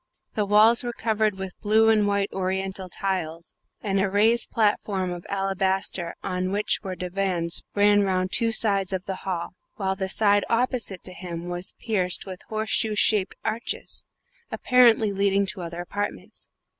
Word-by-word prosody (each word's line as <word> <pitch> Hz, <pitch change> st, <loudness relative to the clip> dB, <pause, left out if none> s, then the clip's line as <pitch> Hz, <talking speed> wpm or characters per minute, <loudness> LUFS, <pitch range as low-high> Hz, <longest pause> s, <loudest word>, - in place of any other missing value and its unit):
The 210 Hz, -2 st, -1 dB
walls 215 Hz, +4 st, +5 dB
were 240 Hz, -1 st, -3 dB
covered 215 Hz, -3 st, 0 dB
with 190 Hz, -1 st, -6 dB
blue 220 Hz, +1 st, +4 dB
and 215 Hz, -2 st, +4 dB
white 200 Hz, 0 st, 0 dB
Oriental 190 Hz, 0 st, -3 dB
tiles, 175 Hz, -4 st, -3 dB, 0.3 s
and 195 Hz, -2 st, 0 dB
a 195 Hz, 0 st, +1 dB
raised 220 Hz, +4 st, +3 dB
platform 205 Hz, -4 st, 0 dB
of 175 Hz, 0 st, -7 dB
alabaster 195 Hz, -2 st, -1 dB
on 185 Hz, -1 st, -2 dB
which 205 Hz, +1 st, 0 dB
were 190 Hz, -3 st, -5 dB
divans 180 Hz, -2 st, -1 dB
ran 205 Hz, 0 st, +5 dB
round 185 Hz, -1 st, 0 dB
two 230 Hz, -1 st, +3 dB
sides 200 Hz, -4 st, 0 dB
of 185 Hz, -1 st, -3 dB
the 190 Hz, -1 st, -4 dB
hall, 175 Hz, -1 st, -3 dB, 0.2 s
while 190 Hz, -2 st, -1 dB
the 190 Hz, -1 st, -3 dB
side 205 Hz, 0 st, +3 dB
opposite 230 Hz, -5 st, 0 dB
to 185 Hz, -, -2 dB
him 175 Hz, -1 st, -6 dB
was 175 Hz, +1 st, -2 dB
pierced 185 Hz, -6 st, -1 dB
with 185 Hz, -2 st, -8 dB
horseshoe 220 Hz, 0 st, -1 dB
shaped 205 Hz, -2 st, +2 dB
arches, 225 Hz, +2 st, -3 dB, 0.5 s
apparently 235 Hz, -4 st, +4 dB
leading 200 Hz, 0 st, +2 dB
to 190 Hz, -1 st, -4 dB
other 170 Hz, 0 st, -5 dB
apartments. 205 Hz, +3 st, -5 dB
195 Hz, 155 wpm, -25 LUFS, 185-215 Hz, 0.5 s, walls